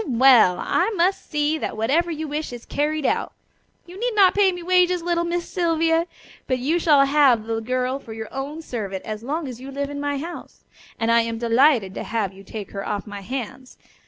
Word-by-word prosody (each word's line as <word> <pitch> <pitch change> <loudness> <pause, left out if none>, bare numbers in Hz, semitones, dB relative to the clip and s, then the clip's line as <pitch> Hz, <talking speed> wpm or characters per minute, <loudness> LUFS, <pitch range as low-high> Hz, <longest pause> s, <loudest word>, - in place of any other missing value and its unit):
Well! 245 -7 +5
I 370 - +1
must 370 +2 0
see 300 +1 0
that - - -4
whatever 290 +11 +1
you 315 -1 -4
wish 300 0 -4
is 240 -1 -9
carried 300 0 -1
out. - - 0 0.5
You 360 +3 -11
need 480 0 -1
not 390 -3 +6
pay 400 -2 +4
me 355 -1 -7
wages, 360 -1 +3
little 345 0 0
Miss 345 0 -2
Sylvia, 330 -1 +1 0.4
but 255 - +1
you 295 +8 0
shall 295 -4 +5
have 275 -5 +4
the 225 0 -2
girl 255 +3 -1
for 235 - -12
your 220 -1 -7
own 285 +4 -5
servant 200 -8 -5
as 215 -1 -5
long 295 +5 -3
as 250 -1 -8
you 270 - -8
live 280 +1 -4
in 285 - -5
my 285 0 -1
house, 335 +5 -8 0.4
and 230 0 +1
I 235 0 +5
am 230 0 -3
delighted 235 -3 +3
to - - -5
have 215 -4 -2
you 195 +1 -14
take 205 0 -8
her 195 -1 -5
off 205 -1 -3
my 205 -2 -8
hands. 255 +3 -6
275 Hz, 215 wpm, -23 LUFS, 230-330 Hz, 0.5 s, not